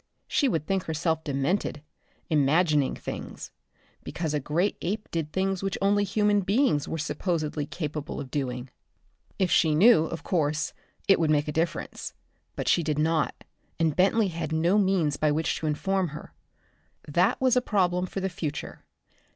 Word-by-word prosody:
She 285 - +2
would 160 -8 -1
think 195 0 -1
herself 160 0 -1
demented, 145 +2 -1 0.4
imagining 150 -1 +2
things, - - -7 0.5
because 160 -3 -3
a 150 - +1
great 165 +8 0
ape 210 +4 -3
did 160 -3 -2
things 190 +1 -1
which 195 0 -2
only 205 +1 +3
human 205 +1 +2
beings 200 - +2
were 160 - -3
supposedly 155 -2 -2
capable 150 -3 -5
of 135 -3 -7
doing. 125 -3 -3 0.7
If 185 -4 +1
she 160 -2 +4
knew, 195 -1 +6
of 160 -2 -6
course, 155 -3 0 0.3
it 195 - +5
would 160 -2 +2
make 150 -1 +2
a - - -1
difference. 165 +3 -3 0.4
But - - -4
she - - +4
did 155 -2 -1
not, 160 0 0 0.4
and 160 -3 +2
Bentley 200 +3 +3
had 165 -1 -4
no 170 +6 +3
means 185 -8 +2
by 155 -1 +2
which 155 +2 0
to 160 - -3
inform 190 +5 0
her. 150 -1 -9 0.7
That 180 - +2
was 255 -1 +3
a 250 - +4
problem 180 -5 +1
for 195 - -5
the 190 - 0
future. 155 -4 -5
165 Hz, 165 wpm, -27 LUFS, 150-195 Hz, 0.7 s, knew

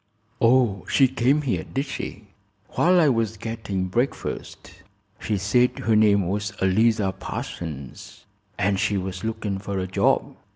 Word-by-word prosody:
"Oh, 115 -5 +3
she 135 - +5
came 135 +3 +1
here, 100 - -1
did 135 +1 -3
she?" 110 -6 -6 0.4
"While 180 +1 +3
I 160 - +5
was 115 -4 0
gettin' 105 -4 -3
breakfast. 95 -4 -4 0.4
She 105 -2 -1
said 120 +6 +2
her 110 +2 +1
name 100 -3 +4
was 100 +1 -2
Eliza 105 +1 +2
Parsons, 75 -7 -7 0.3
an' 100 +1 +1
she 100 +1 0
was 95 0 -5
looking 110 -3 -3
fer 100 0 -4
a 95 - -1
job. 95 - +1
105 Hz, 140 wpm, -24 LUFS, 95-120 Hz, 0.4 s, she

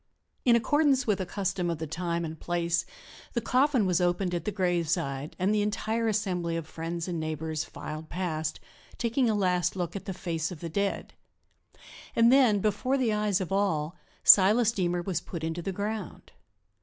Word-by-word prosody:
In 240 -2 +6
accordance 280 +2 +3
with 205 -3 +1
a 185 - -4
custom 190 -2 -2
of 170 - -1
the 160 - -4
time 170 +2 -2
and 160 -1 -7
place, 170 0 -1 0.5
the 235 - +1
coffin 255 0 +2
was 180 -1 +2
opened 180 +1 +1
at 170 -2 -2
the 210 - -1
graveside 170 -6 -1
and 190 +3 +1
the 210 - +2
entire 220 +2 -1
assembly 180 -6 -1
of 165 - -4
friends 165 +2 -5
and 175 -2 -3
neighbors 155 0 -3
filed 155 +1 -8
past, 160 -3 -3 0.4
taking 235 +1 +1
a 215 - +2
last 180 -3 +1
look 175 -1 -3
at 200 - -6
the 190 - -4
face 165 -3 -2
of 180 - -8
the 170 - -5
dead. 200 +4 -2 1.0
And 230 +2 +5
then, 240 -7 +5
before 255 +6 +1
the 240 -5 +1
eyes 210 -2 +1
of 185 - -4
all, 185 -5 0 0.3
Silas 210 +4 +7
Deemer 175 -4 -1
was 175 -3 -2
put 170 -3 -7
into 165 +2 -2
the 195 - -3
ground. 210 +3 -5
180 Hz, 180 wpm, -28 LUFS, 170-210 Hz, 1.0 s, Silas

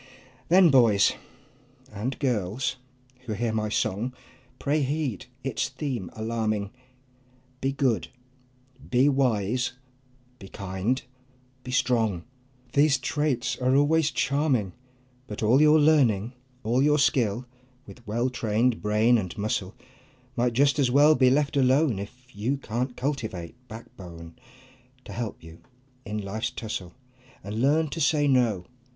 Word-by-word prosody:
Then 180 -1 +6
boys 115 -7 +5 0.8
and 115 +6 -3
girls 125 0 -1 0.5
who 110 - -2
hear 115 +1 -1
my 110 -1 -1
song, 110 +4 -1 0.4
Pray 150 +3 0
heed 140 - -2 0.2
its 135 0 -2
theme 130 - -4
alarming: 110 -2 -2 0.9
Be 135 - 0
good, 125 - 0 0.8
be 130 +3 +4
wise, 125 -4 +1 0.7
be 95 - -10
kind, 100 +7 -2 0.6
be - - -9
strong 120 -8 +1 0.5
These 145 0 +4
traits 135 -1 -1
are 130 +1 +2
always 155 +2 +3
charming, 135 - 0 0.5
But 105 +1 -6
all 120 +6 +4
your 155 +1 +6
learning, 130 -8 +3 0.3
all 120 +4 +1
your 150 +1 +4
skill 125 -5 +1 0.4
With 120 -4 -14
well 120 +4 0
trained 115 0 0
brain 110 +3 +3
and 90 -5 -6
muscle, 100 -2 -2 0.6
Might 120 0 +1
just 140 +4 +3
as 135 -3 +3
well 145 +4 +6
be 130 -3 +4
left 140 +2 +1
alone, 135 -3 +3
If 125 +5 -11
you 120 +7 -1
can't 125 0 -4
cultivate 110 - -3
backbone 85 -7 -11 0.7
To 100 - -9
help 115 -3 -5
you 80 +1 -13 0.4
in 105 -1 -4
life's 105 +2 -3
tussle, 100 -6 -6 0.5
And 105 +4 -4
learn 155 +4 +3
to 165 - -4
say 150 -1 +3
"No!" 120 -9 +2
125 Hz, 130 wpm, -26 LUFS, 105-140 Hz, 0.9 s, Then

